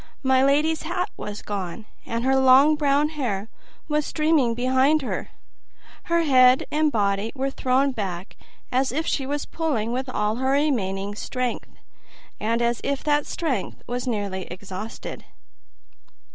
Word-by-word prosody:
My 260 0 +4
lady's 300 +3 +2
hat 360 +4 -2
was 210 0 -7
gone, 200 +1 -5 0.2
and 230 0 -2
her 265 0 +3
long 265 +3 +6
brown 295 0 +2
hair 230 -9 -3 0.4
was 300 -1 +1
streaming 305 -7 +2
behind 260 +5 +2
her. - - -4 0.8
Her 335 0 +2
head 255 -3 +5
and 305 0 +2
body 200 -1 0
were 270 0 -1
thrown 265 +2 +1
back, 190 -6 -5 0.4
as 260 0 +1
if 310 +5 -1
she 270 -5 -1
were 290 +1 0
pulling 265 -9 -1
with 255 +2 -2
all 210 -2 -1
her 265 +1 +1
remaining 205 -9 0
strength, 250 +3 -3 0.7
and 230 +2 0
as 235 0 0
if 280 -1 -2
that 295 -1 +1
strength 270 - -3
were 245 +1 -2
nearly 200 -5 -2
exhausted. 190 +4 -7
260 Hz, 145 wpm, -24 LUFS, 215-290 Hz, 0.8 s, long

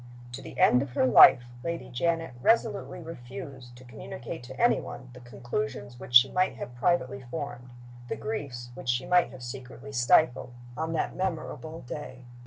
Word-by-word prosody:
To 120 - -7
the - - -10
end 125 - +6
of 135 -3 -5
her - - +2
life 125 -1 +8 0.2
Lady 170 0 -4
Janet 165 +3 -1
resolutely 205 - +1
refused 130 -4 -9
to 125 - -14
communicate 120 -1 -8
to - - -10
any 240 +1 +4
one 125 -1 -9
the 125 - -11
conclusions 120 -1 -5
which 120 - -6
she 120 +2 +8
might 185 -7 +1
have 120 +1 -7
privately 130 -1 0
formed, 125 -4 -6 0.4
the - - -2
griefs 125 - -5
which 125 0 -7
she 120 +2 +1
might 180 +2 +3
have 130 -2 -11
secretly 130 +2 -8
stifled, 125 0 +3 0.2
on 160 +3 -3
that - - -1
memorable 165 -3 -4
day. 130 -1 -8
130 Hz, 170 wpm, -28 LUFS, 120-165 Hz, 0.4 s, life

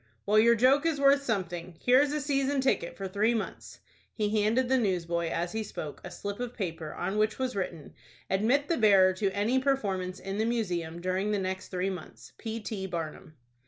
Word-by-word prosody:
"Well, 210 +1 +4
your 235 +2 +6
joke 260 +5 +4
is 315 -3 0
worth 280 0 +5
something. 180 -8 -3
Here 255 +2 +5
is 290 0 +1
a 300 - -1
season 280 -1 0
ticket 260 -10 0
for 195 - -4
three 210 +5 +1
months." 220 - -5 0.3
He 210 -1 +1
handed 230 +5 +2
the 260 +1 +3
newsboy, 170 -5 0
as 170 +1 -2
he 220 - -2
spoke, 155 -8 -7
a - - -6
slip 200 +1 -6
of 245 0 -4
paper 165 -6 -4
on 205 +2 -2
which 215 0 +1
was 255 -3 -2
written:— 175 -5 -4 0.3
"Admit 235 +10 +2
the 335 - +1
bearer 195 -5 +6
to 195 +1 0
any 210 +6 +1
performance 195 -9 -1
in 195 +2 -4
the 220 - +2
Museum 175 -8 -2
during 185 +3 -1
the 210 - +1
next 190 -1 -3
three 185 +1 -2
months. 120 -10 -10
P. 225 -1 -4
T. 200 -3 -4
BARNUM." 165 -1 -6
205 Hz, 200 wpm, -29 LUFS, 185-245 Hz, 0.3 s, your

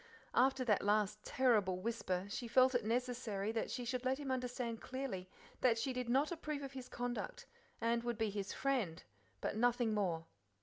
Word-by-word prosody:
After 265 0 +4
that 210 -4 +3
last 210 0 +2
terrible 215 -8 +3
whisper, 185 -3 -1
she 235 +4 -4
felt 255 +2 +5
it 245 -2 +2
necessary 230 -3 -1
that 225 0 -1
she 245 - -3
should 250 +1 -2
let 260 +1 +1
him 280 -2 -3
understand 245 -2 -2
clearly 250 -9 -4 0.3
that 240 -3 +4
she 255 +3 -1
did 250 -1 -3
not 275 +6 +3
approve 305 -4 -3
of 275 - -5
his 255 -2 -7
conduct, 245 - -3 0.3
and 235 0 +2
would 240 -2 -1
be 220 -2 0
"his 200 -1 -3
friend," 245 -12 0 0.4
but - - -1
nothing 240 0 +3
more. 175 -6 0
240 Hz, 180 wpm, -37 LUFS, 210-255 Hz, 0.4 s, felt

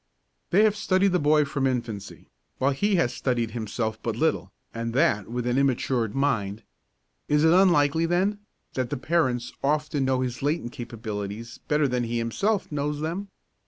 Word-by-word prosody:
They 195 +4 +5
have 215 -1 +4
studied 195 -2 +2
the 180 - +2
boy 150 0 +4
from 140 -1 0
infancy, 115 -6 -4 0.3
while 135 +2 +2
he 200 +9 +1
has 145 -9 +1
studied 120 -4 -1
himself 110 0 -3
but 115 -2 -2
little, 115 - 0 0.2
and 115 0 -4
that 130 - +2
with 120 0 -3
an 125 +1 +1
immatured 125 -4 0
mind. 115 -7 0 0.6
Is 150 +1 +3
it 160 +1 +6
unlikely, 165 -4 +4
then, 190 +4 +1 0.3
that 130 -2 -2
the - - -2
parents 130 -5 0
often 150 -1 +1
know 130 -1 +1
his 125 -2 -3
latent 145 -3 -1
capabilities 110 -1 -6
better 150 -1 +2
than 125 -2 -1
he 120 +1 -2
himself 190 - -1
knows 150 0 -2
them? 170 +6 -3
135 Hz, 165 wpm, -26 LUFS, 115-160 Hz, 0.6 s, it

